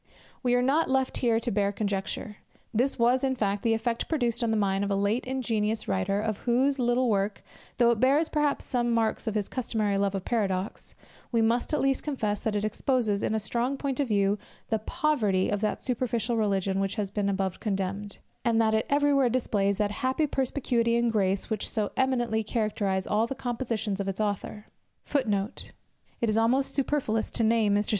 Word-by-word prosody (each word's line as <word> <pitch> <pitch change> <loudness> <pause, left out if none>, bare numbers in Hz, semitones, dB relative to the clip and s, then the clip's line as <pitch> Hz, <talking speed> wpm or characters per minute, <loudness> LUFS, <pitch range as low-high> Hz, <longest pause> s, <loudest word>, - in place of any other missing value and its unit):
We 245 -2 +2
are 245 - +2
not 290 +6 +2
left 265 0 +1
here 230 -3 +2
to 235 +1 -2
bare 200 0 +1
conjecture. 205 +1 -3 0.4
This 250 +5 +1
was, 245 +2 +3
in 265 -1 +1
fact, 205 -4 -1
the 225 -1 +2
effect 230 +1 -2
produced 240 -6 0
on 230 - +1
the 220 - +1
mind 195 -1 +1
of 200 - -1
a 200 - +1
late 200 +5 0
ingenious 225 -4 -1
writer, 195 +1 0
of 215 -1 -2
whose 265 +3 +1
little 245 +1 +2
work, 200 -1 0 0.3
though 235 -1 +5
it 230 - 0
bears 280 +6 +3
perhaps 295 -2 0
some 240 -1 0
marks 225 +1 0
of 220 - -1
his 205 -2 0
customary 215 -5 -1
love 200 0 +1
of 190 - -4
paradox, 195 -4 -2 0.4
we 235 - +2
must 230 +5 +1
at 300 - +1
least 270 0 +1
confess, 215 -9 -2
that 220 -2 -1
it 205 +1 0
exposes, 215 -2 0
in 220 - 0
a - - +1
strong 240 +5 -1
point 270 -1 -3
of 280 - +1
view, 200 -1 +2 0.3
the 220 - +1
poverty 220 - +1
of 205 -1 -1
that 215 -1 -1
superficial 240 -2 -1
religion 195 -3 0
which 195 0 -1
has 205 -3 -2
been 200 -1 0
above 190 -2 -1
condemned; 195 0 -3 0.3
and 230 -1 +2
that 220 -1 +3
it 220 - +1
every 290 0 +3
where 270 -3 +4
displays 205 -5 0
that 210 -1 0
happy 260 +8 0
perspicuity, 250 -4 0
and 235 -1 +2
grace, 195 0 0
which 215 -2 -1
so 215 -3 -1
eminently 240 -4 +1
characterize 210 -3 -1
all 215 +2 +1
the 270 - -4
compositions 230 -5 -2
of 200 - -2
its 195 +1 -3
author. 210 0 -3
220 Hz, 180 wpm, -27 LUFS, 205-250 Hz, 0.4 s, though